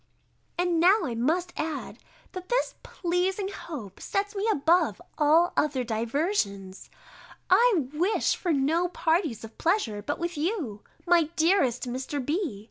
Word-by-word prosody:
And 350 -1 +1
now 380 +6 +5
I 255 -7 -2
must 325 +10 0
add, 310 -1 -4 0.3
that 365 -1 -8
this - - +1
pleasing 370 +3 -1
hope 285 - -8
sets 405 +1 -2
me 400 +2 -1
above 335 +2 +2 0.2
all 315 +4 +4
other 285 -4 +1
diversions: 225 - -2 0.6
I 450 - +5
wish 355 +8 +1
for 350 - -2
no 315 +5 +2
parties 320 - 0
of 225 0 -11
pleasure 320 - 0
but 290 +8 -3
with 345 -1 -4
you, 300 - -2 0.2
my 345 -2 +4
dearest 320 - +2
Mr. 260 +4 -3
B. 305 - -2
325 Hz, 135 wpm, -27 LUFS, 260-360 Hz, 0.6 s, now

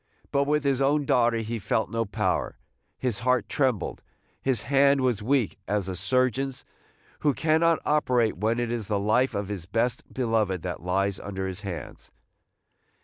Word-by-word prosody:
But 140 0 +2
with 150 0 +1
his 140 -1 +1
own 145 +1 +2
daughter 120 -3 +3
he 115 +1 -3
felt 110 +2 -1
no 115 0 0
power, 100 -3 -1 0.2
– - - -47
his 115 -5 -1
heart 125 0 +1
trembled, 130 -9 0 0.2
– - - -40
his 130 -5 +1
hand 140 +1 +4
was 125 -5 +1
weak 115 - 0
as 105 -1 0
the 95 -1 -4
surgeon's 130 +6 0 0.5
who 145 -3 +2
cannot 160 +1 +3
operate 125 -7 +2
when 110 +5 0
it 120 -1 -1
is 115 -4 -3
the 105 - 0
life 110 +6 +2
of 100 -1 -2
his 95 -5 -5
best 115 +4 -1
beloved 110 -8 0
that 90 -2 -4
lies 95 +2 0
under 95 -1 -4
his 95 +1 -6
hands. 90 - -7
115 Hz, 175 wpm, -26 LUFS, 100-135 Hz, 0.5 s, hand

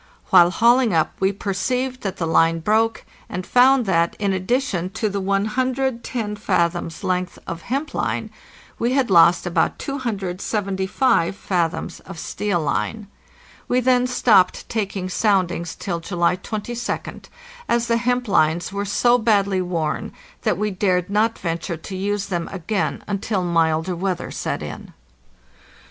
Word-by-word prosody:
While 175 0 +7
hauling 235 +1 +3
up 160 - +1
we 190 +1 +2
perceived 250 +7 -2
that 195 -2 -4
the 170 - -1
line 165 0 +3
broke, 220 +6 +1 0.2
and 180 0 -4
found 255 0 +5
that, 170 -3 +1
in 200 -2 0
addition 185 -2 -1
to 215 - -1
the 200 0 -3
110 235 +2 -1
fathoms' 170 -4 -1
length 185 -1 -1
of 170 -1 -6
hemp 275 - -3
line, - - -2 0.5
we 240 +2 +1
had 260 -6 +1
lost 170 +1 +6
about 175 - +1
275 195 -4 -1
fathoms 175 -5 -2
of 190 -2 -11
steel 200 +2 -2
line. 200 +8 -2 0.6
We 250 - +2
then 250 0 +3
stopped 220 -7 +3
taking 200 -4 -2
soundings 185 -4 0
till 170 -3 -3
July 175 0 0
22d, 220 +5 -5 0.4
as 235 0 +2
the 230 0 +2
hemp 245 +1 0
lines 175 0 +2
were 200 0 -2
so 240 +5 +3
badly 200 -4 +2
worn 170 -4 -2 0.3
that - - 0
we 210 +1 -1
dared 185 -1 0
not 220 +2 +2
venture 170 0 -3
to 190 +4 -8
use 200 +1 -1
them 175 -4 -3
again 185 -2 -2
until 200 -1 -1
milder 165 0 +1
weather 185 +1 -3
set - - -3
in. - - -8
195 Hz, 140 wpm, -22 LUFS, 175-230 Hz, 0.6 s, While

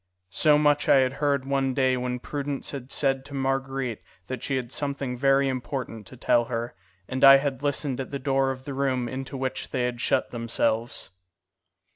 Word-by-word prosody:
So 150 +9 +4
much 150 -1 +2
I - - +8
had 130 -1 +3
heard 140 -2 +1
one 135 -1 0
day 130 -2 +3
when 125 0 -2
Prudence 140 +2 -4
had 135 -2 -7
said 135 -2 +1
to 140 - -9
Marguerite 135 -3 -2 0.2
that 130 +2 -5
she 135 - -1
had 125 -2 -3
something 140 -3 -2
very 135 +2 +3
important 125 -4 -4
to 130 - -11
tell 120 0 +3
her, 120 0 -3 0.3
and 130 0 -3
I 135 0 +11
had 135 -2 -2
listened 140 -2 -1
at 130 - -6
the 140 - -3
door 135 0 +1
of 130 0 -5
the 140 - -5
room 130 -2 0
into 135 +2 -5
which 130 0 -3
they 130 -2 -1
had 125 -1 -2
shut - - +1
themselves. 115 -1 -1
135 Hz, 190 wpm, -26 LUFS, 125-140 Hz, 0.3 s, I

